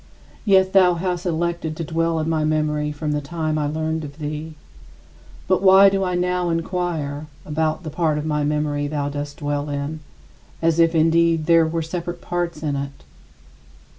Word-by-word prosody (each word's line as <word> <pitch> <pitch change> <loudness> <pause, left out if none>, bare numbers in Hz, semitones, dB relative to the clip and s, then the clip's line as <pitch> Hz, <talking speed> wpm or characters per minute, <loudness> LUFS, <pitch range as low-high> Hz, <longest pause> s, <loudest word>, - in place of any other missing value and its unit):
Yet 190 -2 +4
thou 180 -2 +5
hast 180 0 -2
elected 170 -1 -2
to 165 - -3
dwell 165 +1 0
in 155 - -2
my 160 -1 +1
memory 150 -1 0
from 150 0 -3
the 150 0 -1
time 155 +1 -2
I 150 - 0
learned 160 +1 -2
of 145 0 -9
thee. 155 +1 -5 0.9
But 185 0 +2
why 195 0 +8
do 195 0 0
I 180 -1 -1
now 180 0 0
inquire 165 -4 -2 0.2
about 155 +3 -1
the 155 - -5
part 155 -2 0
of 150 - -3
my 150 -1 0
memory 145 -1 0
thou 145 -1 -2
dost 145 0 -5
dwell 145 -1 -2
in, 145 +2 -3 0.6
as 165 0 +1
if 165 0 +4
indeed 165 0 +3
there 165 -1 +5
were 165 0 -2
separate 175 +1 -5
parts 170 -3 -3
in 145 -2 -1
it? 140 - -6
160 Hz, 175 wpm, -22 LUFS, 150-170 Hz, 0.9 s, why